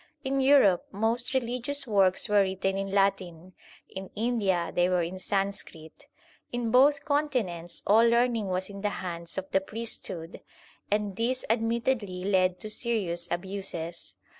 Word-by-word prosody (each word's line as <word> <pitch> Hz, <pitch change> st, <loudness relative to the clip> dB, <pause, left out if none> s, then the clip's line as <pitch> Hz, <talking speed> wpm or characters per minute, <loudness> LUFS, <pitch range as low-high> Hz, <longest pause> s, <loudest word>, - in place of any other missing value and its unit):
In 270 Hz, +1 st, 0 dB
Europe 265 Hz, -9 st, +5 dB
most 225 Hz, +4 st, 0 dB
religious 255 Hz, +3 st, 0 dB
works 195 Hz, -5 st, +2 dB
were 210 Hz, -1 st, +4 dB
written 190 Hz, 0 st, -1 dB
in 195 Hz, 0 st, -2 dB
Latin, 185 Hz, -3 st, 0 dB, 0.3 s
in 190 Hz, 0 st, -8 dB
India 205 Hz, -7 st, 0 dB
they 175 Hz, +1 st, +2 dB
were 180 Hz, -1 st, +2 dB
in 180 Hz, +3 st, -5 dB
Sanskrit. 195 Hz, -4 st, -4 dB, 0.4 s
In 240 Hz, -2 st, -2 dB
both 280 Hz, +3 st, +4 dB
continents 240 Hz, -, -1 dB
all 225 Hz, +3 st, +5 dB
learning 235 Hz, -3 st, +2 dB
was 185 Hz, 0 st, -2 dB
in 200 Hz, -1 st, -9 dB
the 205 Hz, -, 0 dB, 0.2 s
hands 170 Hz, 0 st, -4 dB
of 190 Hz, 0 st, -5 dB
the 190 Hz, -, +3 dB
priesthood, 195 Hz, -6 st, -6 dB, 0.5 s
and 205 Hz, -2 st, -1 dB
this 250 Hz, +3 st, -1 dB
admittedly 225 Hz, -4 st, -1 dB
led 185 Hz, -2 st, +2 dB
to -, -, -3 dB
serious 210 Hz, -6 st, -1 dB
abuses. 175 Hz, -2 st, -4 dB
200 Hz, 140 wpm, -28 LUFS, 185-235 Hz, 0.5 s, Europe